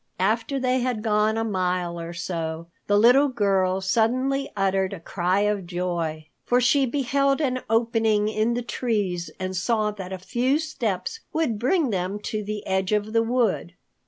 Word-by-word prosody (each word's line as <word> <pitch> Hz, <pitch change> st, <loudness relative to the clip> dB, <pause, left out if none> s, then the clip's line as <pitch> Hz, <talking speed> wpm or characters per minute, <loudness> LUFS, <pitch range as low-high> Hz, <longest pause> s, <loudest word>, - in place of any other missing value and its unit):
After 225 Hz, +8 st, 0 dB
they 255 Hz, 0 st, +1 dB
had 245 Hz, -3 st, -2 dB
gone 215 Hz, 0 st, +2 dB
a 225 Hz, -, 0 dB
mile 180 Hz, -4 st, -1 dB
or 170 Hz, 0 st, -6 dB
so, 170 Hz, -1 st, -4 dB, 0.2 s
the 205 Hz, -, +3 dB
little 250 Hz, +7 st, +6 dB
girl 195 Hz, -6 st, +1 dB
suddenly 255 Hz, +7 st, +1 dB
uttered 195 Hz, -1 st, +1 dB
a 195 Hz, -, -6 dB
cry 180 Hz, +3 st, 0 dB
of 205 Hz, -3 st, 0 dB
joy, 170 Hz, -3 st, -3 dB, 0.2 s
for 245 Hz, -, +2 dB
she 260 Hz, +3 st, +3 dB
beheld 275 Hz, +2 st, +1 dB
an 255 Hz, -4 st, 0 dB
opening 225 Hz, -2 st, +2 dB
in 220 Hz, +2 st, 0 dB
the 245 Hz, -, -2 dB
trees 200 Hz, -9 st, -2 dB
and 185 Hz, 0 st, -3 dB
saw 215 Hz, +3 st, +1 dB
that 190 Hz, -3 st, -8 dB
a 190 Hz, -, -3 dB
few 245 Hz, +9 st, 0 dB
steps 295 Hz, -, -3 dB
would 290 Hz, -10 st, 0 dB
bring 270 Hz, -, +2 dB
them 185 Hz, +1 st, -2 dB
to 215 Hz, 0 st, -3 dB
the 210 Hz, 0 st, -5 dB
edge 190 Hz, 0 st, 0 dB
of 210 Hz, +1 st, 0 dB
the 230 Hz, -, +4 dB
wood. 225 Hz, -6 st, 0 dB
210 Hz, 170 wpm, -24 LUFS, 185-245 Hz, 0.2 s, little